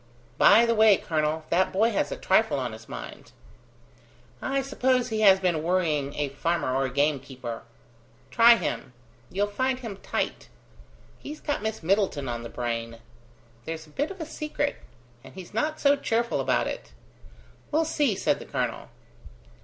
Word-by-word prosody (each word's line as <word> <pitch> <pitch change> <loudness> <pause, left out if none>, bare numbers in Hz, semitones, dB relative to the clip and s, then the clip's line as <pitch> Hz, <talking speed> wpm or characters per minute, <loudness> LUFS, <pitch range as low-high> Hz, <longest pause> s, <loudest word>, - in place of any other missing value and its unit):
By 225 +3 +7
the 230 - +2
way, 215 -3 +6
colonel, 155 0 -1
that 185 +2 +2
boy 220 +5 +2
has 200 - -1
a - - -3
trifle - - +2
on - - -2
his - - -12
mind." - - -9 1.1
"I 275 0 -1
suppose 260 -2 +1
he 220 -1 -1
has 195 -2 +7
been 175 -4 0
worrying 155 -5 0
a 145 -1 -1
farmer 145 -1 -1
or 135 0 +1
a - - -2
gamekeeper." 135 -4 -2 0.7
"Try 235 0 +7
him. 175 - -4 0.4
You'll 200 +2 0
find 255 +5 -1
him 230 -6 -7
tight. - - -3 0.7
He's 300 +1 -8
got 290 - -2
Miss 220 -3 -4
Middleton 185 -6 +1
on 120 -1 -3
the 115 - -7
brain. 115 -1 -4 0.7
There's 160 0 -5
a 155 - -19
bit 290 - -1
of 390 -1 -9
a 320 - -4
secret; 300 -2 -3 0.5
and - - -14
he's 185 0 -10
not 305 +8 -1
so 285 0 +4
cheerful 235 -4 0
about - - +1
it." - - -6 0.8
"We'll 320 +2 +2
see," 290 -8 +1
said - - 0
the - - -9
colonel. - - -3
195 Hz, 165 wpm, -26 LUFS, 150-250 Hz, 1.1 s, By